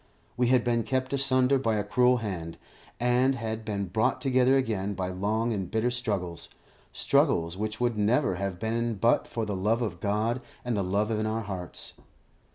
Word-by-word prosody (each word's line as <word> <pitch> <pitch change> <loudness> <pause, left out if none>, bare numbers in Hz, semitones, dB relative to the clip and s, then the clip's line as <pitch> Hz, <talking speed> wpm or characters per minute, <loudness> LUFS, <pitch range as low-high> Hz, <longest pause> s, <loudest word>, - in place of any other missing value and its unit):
We 125 0 +2
had 125 -1 +4
been 120 -1 +1
kept 130 +2 -1
asunder 135 -1 +3
by 115 -4 +1
a 105 - 0
cruel 125 +5 +3
hand, 85 -5 -5 0.4
and 125 +2 +3
had 110 -2 -4
been 100 -2 -2
brought 105 +5 0
together 130 0 +3
again 105 -6 -1
by 95 -1 -2
long 110 +5 -1
and 95 -4 -3
bitter 110 +2 0
struggles, 100 -9 -3 0.4
struggles 85 +1 +2
which 105 +2 -4
would 120 -3 0
never 110 +1 +2
have 100 -1 -3
been 115 +3 -1
but 115 +4 +2
for 115 -2 -3
the 105 -2 -3
love 110 +6 +1
of 90 -7 -4
God 110 +5 0 0.2
and 120 -2 0
the 100 - 0
love 100 +4 0
in 110 0 0
our 110 +1 -1
hearts. 95 -4 -6
110 Hz, 180 wpm, -28 LUFS, 100-125 Hz, 0.4 s, had